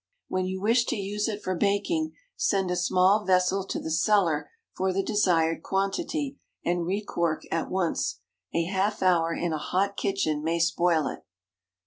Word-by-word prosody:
When 185 0 0
you 190 0 -3
wish 230 +4 +3
to 260 - -1
use 205 0 -2
it 210 -2 -4
for 185 - -1
baking, 260 - 0 0.2
send 190 -3 +1
a - - +1
small 185 +4 +3
vessel 185 +1 +2
to - - -2
the 160 - -5
cellar 170 -3 +2 0.3
for 190 0 0
the 195 +1 0
desired 170 -6 +2
quantity, 275 - -2 0.3
and 175 -1 0
re 200 +3 -1
cork 170 -5 -1
at 165 - -1
once. 185 -3 -1 0.3
A 170 - +1
half 195 +3 -1
hour 170 -3 +3
in 170 0 -1
a 155 - -2
hot 195 +6 -1
kitchen 155 -7 0
may 165 +1 0
spoil 170 -1 +2
it. - - -5
185 Hz, 170 wpm, -27 LUFS, 170-205 Hz, 0.3 s, wish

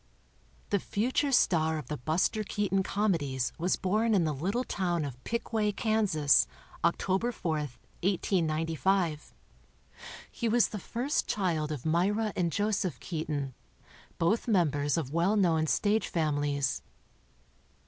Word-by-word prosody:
The 200 - +3
future 255 +9 0
star 160 -10 +3
of 150 - -6
the 150 +4 -4
Buster 165 - 0
Keaton 200 -2 0
Comedies 165 - 0
was 180 +3 +1
born 215 +4 +1
in 185 - +3
the 155 -2 0
little 195 - -1
town 175 -8 -1
of 125 -2 -8
Pickway, 225 -2 0
Kansas, 200 -11 +3 0.4
October 190 +7 +1
4, 165 -9 -2 0.4
1895. 165 -2 0 1.0
He 235 - -2
was 235 +1 +3
the 210 - -5
first 250 - -1
child 165 -7 0
of 145 -3 -5
Myra 200 +6 +1
and 175 -3 0
Joseph 200 - -1
Keaton, 150 -4 -3 0.6
both 200 +9 +1
members 145 - +2
of 155 -6 -2
w 165 +4 -1
r - - +3
ell 200 +4 +3
known 165 -5 +3
stage 210 +6 +1
families. 145 -4 0
175 Hz, 130 wpm, -30 LUFS, 155-210 Hz, 1.0 s, The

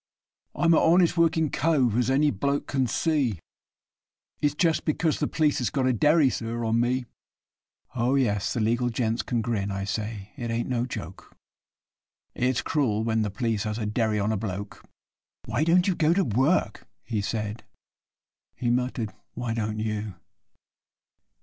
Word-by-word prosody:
'I - - 0
am 165 - +6
a - - +5
honest 175 +1 +4
workin' 160 -3 +2
cove, 135 -8 +2
as 125 +1 +1
any 145 +2 +3
bloke 140 +7 -1
can 135 -2 0
see, 140 - 0 1.0
It's 145 -1 +1
just 165 0 +2
because 155 0 0
the 150 - 0
p'leece 150 -2 +1
has 125 - 0
got 135 -3 0
a 130 - +3
derry, 150 +5 +4
sir, 115 0 -3
on 115 +1 +2
me; 125 +1 0 0.9
Oh, 125 +2 +1
yes, 110 -6 +1
the 120 - -1
legal 120 +3 +1
gents 115 -1 -1
can 120 -3 -2
grin, 105 -4 -1
I 95 0 -3
say 105 0 -4
it 120 -1 -4
ain't 115 +1 -1
no 125 -1 -1
joke 90 -6 -8 1.0
It's 125 0 0
cruel 115 -8 0
when 110 -1 +1
the 105 - 0
p'leece 110 +1 -1
has 105 0 -2
got 115 - -3
a 105 - -2
derry 110 -1 +1
on 105 +2 0
a 110 - 0
bloke.' 100 -1 -6 0.6
'Why 135 - 0
don't 175 +3 +3
you 190 - +3
go 165 0 +2
to 195 - +3
work?' 130 - +1 0.2
he 110 -4 -2
said 105 +1 -3 0.9
(he 120 -1 -1
muttered, 125 -3 -1 0.2
'Why 120 -1 -2
don't 110 -1 -2
you? 110 -2 -3
120 Hz, 170 wpm, -26 LUFS, 110-145 Hz, 1.0 s, am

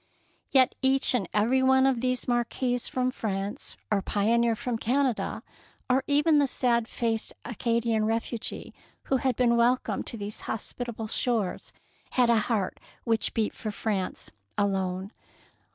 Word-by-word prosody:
Yet 260 -2 +4
each 265 0 +3
and 205 -8 0
every 235 +5 +2
one 265 0 +5
of 260 -3 +2
these, 255 -1 -1
marquis 245 +1 0
from 255 +1 -1
France 205 0 -4
or 205 -2 +3
pioneer 230 +4 +2
from 230 +1 -3
Canada, 255 +1 0 0.5
or 260 +1 +3
even 295 +1 +4
the 285 - +3
sad 235 -3 +1
faced 225 -2 -2
Acadian 230 -1 0
refugee 225 +1 -3 0.3
who 270 - +1
had 260 -1 0
been 240 -1 +3
welcomed 245 +2 +1
to 235 - -6
these 205 0 -6
hospitable 230 0 -4
shores, 220 -4 -1 0.4
had 245 -2 +4
a 230 - +4
heart 210 -3 -1 0.2
which 225 -1 0
beat 220 -2 0
for 215 - -5
France 205 -2 -3 0.3
alone. 190 -1 -1
235 Hz, 140 wpm, -27 LUFS, 215-255 Hz, 0.5 s, one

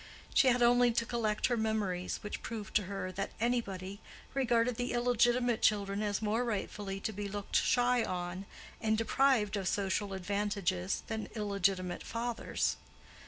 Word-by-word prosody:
She 270 - +5
had 245 -1 +4
only 245 0 +5
to 235 0 +1
collect 220 -3 0
her 245 - +2
memories, 215 -5 -1
which 210 - -5
proved 220 -3 -6
to 210 - -2
her 190 -1 -4
that 195 +2 -3
"anybody" 200 -5 -1 0.3
regarded 245 -2 +2
the 245 0 -2
illegitimate 240 0 +2
children 200 -1 +2
as 210 0 -1
more 220 +3 +1
rightfully 205 -3 -3
to 220 - -2
be 205 +1 -4
looked 200 0 -5
shy 245 -1 +3
on 180 +1 -4 0.3
and 220 -1 +2
deprived 225 -2 +2
of 190 -2 -2
social 200 0 0
advantages 195 -1 -1
than 220 -1 -4
illegitimate 195 -4 0
fathers. 235 0 -2
210 Hz, 150 wpm, -32 LUFS, 195-235 Hz, 0.3 s, She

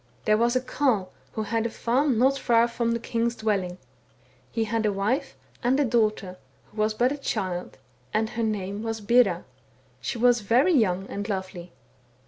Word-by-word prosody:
" - - -33
There 215 - +4
was 240 +2 +2
a 255 - +2
Carle 250 -8 0 0.2
who 220 - -2
had 225 +2 0
a - - -5
farm 250 +3 +1
not 265 +4 +4
far 235 -3 +3
from 235 0 -1
the 235 - -1
king's 235 0 -1
dwelling; 195 -5 -1 0.7
he 225 - 0
had 225 0 -1
a 210 - +2
wife, 225 +9 -1 0.2
and 255 +3 +2
a 290 - +3
daughter, 215 -5 0 0.3
who - - -19
was 215 0 +1
but 245 +4 +2
a 290 - -3
child, 185 -9 -3 0.3
and 220 +1 0
her 235 - -3
name 205 -2 -2
was 225 0 -3
Bera; 210 -5 +3 0.5
she - - -4
was 240 0 +4
very 245 - +3
young 190 - +2
and 205 +2 -5
lovely. 185 -3 -5
225 Hz, 185 wpm, -26 LUFS, 200-240 Hz, 0.7 s, There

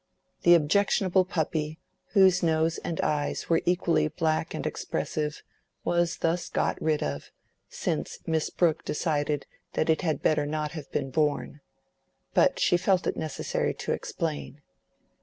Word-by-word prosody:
The 175 0 +7
objectionable 185 +3 +3
puppy, 155 -3 -2 0.4
whose 190 -2 +6
nose 160 -1 +1
and 165 - -4
eyes 145 -1 -1
were 165 -1 +3
equally 175 -3 +2
black 160 +1 -1
and - - -4
expressive, 150 0 -3 0.4
was 175 -1 +1
thus 170 +1 -1
got - - -1
rid 155 -1 +1
of, 70 0 -4 0.4
since - - -3
Miss 160 -1 0
Brooke 165 -3 +1
decided 150 -2 -1 0.3
that 160 - +2
it 160 - +1
had 160 -4 -1
better 150 -1 +2
not 150 0 -2
have 155 -4 -8
been 135 - -2
born. 150 0 0 0.7
But - - +3
she 175 - +4
felt 185 0 +2
it - - 0
necessary 155 -3 -2
to - - -4
explain. 150 -2 -4
160 Hz, 140 wpm, -27 LUFS, 150-175 Hz, 0.7 s, The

